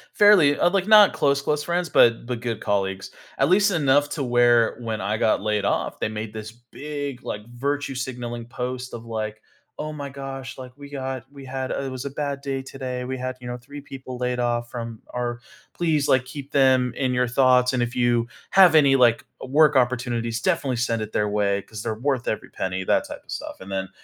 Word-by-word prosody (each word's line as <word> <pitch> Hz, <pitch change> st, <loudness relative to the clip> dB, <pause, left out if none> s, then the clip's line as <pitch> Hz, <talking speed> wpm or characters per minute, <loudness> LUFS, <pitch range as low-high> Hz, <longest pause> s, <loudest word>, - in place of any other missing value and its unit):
Fairly, 185 Hz, -9 st, +6 dB
uh, 175 Hz, -, +4 dB
like, 195 Hz, 0 st, 0 dB
not 210 Hz, -2 st, +8 dB
close, 140 Hz, -1 st, +1 dB
close 150 Hz, +1 st, -1 dB
friends, 175 Hz, 0 st, -1 dB
but 115 Hz, -2 st, +4 dB
but 125 Hz, -2 st, -3 dB
good 115 Hz, -2 st, -4 dB
colleagues, 95 Hz, -2 st, -1 dB, 0.3 s
at -, -, +3 dB
least 200 Hz, +2 st, +4 dB
enough 145 Hz, -3 st, +3 dB
to 145 Hz, -1 st, -3 dB
where 120 Hz, -2 st, +3 dB
when 110 Hz, -3 st, -4 dB
I 105 Hz, +3 st, -1 dB
got 110 Hz, -, +2 dB
laid 105 Hz, -1 st, 0 dB
off, -, -, -1 dB
they -, -, 0 dB
made 110 Hz, 0 st, -5 dB
this 110 Hz, 0 st, -7 dB
big, 140 Hz, +3 st, -7 dB
like, 105 Hz, -, -5 dB
virtue 140 Hz, +2 st, -2 dB
signaling 120 Hz, -2 st, -5 dB
post 125 Hz, +1 st, -5 dB
of, 115 Hz, -1 st, -7 dB
like, 110 Hz, -1 st, -4 dB, 0.4 s
"Oh 155 Hz, 0 st, -3 dB
my 145 Hz, -2 st, -6 dB
gosh." 135 Hz, -1 st, -7 dB
like, 130 Hz, -1 st, -8 dB
"We 140 Hz, 0 st, -11 dB
got 130 Hz, -2 st, -4 dB
we 140 Hz, -1 st, -11 dB
had 130 Hz, 0 st, -4 dB
It 135 Hz, -1 st, -2 dB
was 130 Hz, +1 st, -6 dB
a 140 Hz, -, -4 dB
bad 140 Hz, -1 st, -3 dB
day 135 Hz, -1 st, -3 dB
today. 130 Hz, -2 st, -5 dB
We 130 Hz, +1 st, -4 dB
had, 130 Hz, 0 st, -4 dB
you 120 Hz, -, -8 dB
know, 120 Hz, -, -4 dB
3 145 Hz, +4 st, -10 dB
people 130 Hz, -2 st, -9 dB
laid 125 Hz, 0 st, -1 dB
off 120 Hz, -1 st, -1 dB
from 115 Hz, -2 st, -6 dB
our 120 Hz, -1 st, -2 dB, 0.3 s
Please, 155 Hz, -4 st, +1 dB
like, 130 Hz, -1 st, +3 dB
keep 140 Hz, +1 st, -9 dB
them 130 Hz, -3 st, +3 dB
in 130 Hz, -2 st, 0 dB
your 125 Hz, 0 st, +2 dB
thoughts, 125 Hz, 0 st, +4 dB
and 125 Hz, -, +1 dB
if 120 Hz, +1 st, -2 dB
you 120 Hz, -1 st, +2 dB, 0.2 s
have 185 Hz, -4 st, +7 dB
any, 140 Hz, -3 st, +6 dB
like, 120 Hz, -3 st, +4 dB, 0.2 s
work 150 Hz, +2 st, +4 dB
opportunities, 120 Hz, -2 st, 0 dB
definitely 130 Hz, 0 st, 0 dB
send 115 Hz, -1 st, -1 dB
it 110 Hz, 0 st, -5 dB
their 105 Hz, -, 0 dB
way 100 Hz, -1 st, +1 dB
'cause 110 Hz, -2 st, -9 dB
they're 110 Hz, 0 st, -3 dB
worth 130 Hz, +1 st, -1 dB
every 110 Hz, -, -3 dB
penny," 95 Hz, 0 st, -3 dB
that -, -, +1 dB
type -, -, -9 dB
of -, -, -13 dB
stuff, -, -, -6 dB
and 95 Hz, +1 st, -10 dB
then, 95 Hz, 0 st, -3 dB
125 Hz, 215 wpm, -24 LUFS, 115-140 Hz, 0.4 s, not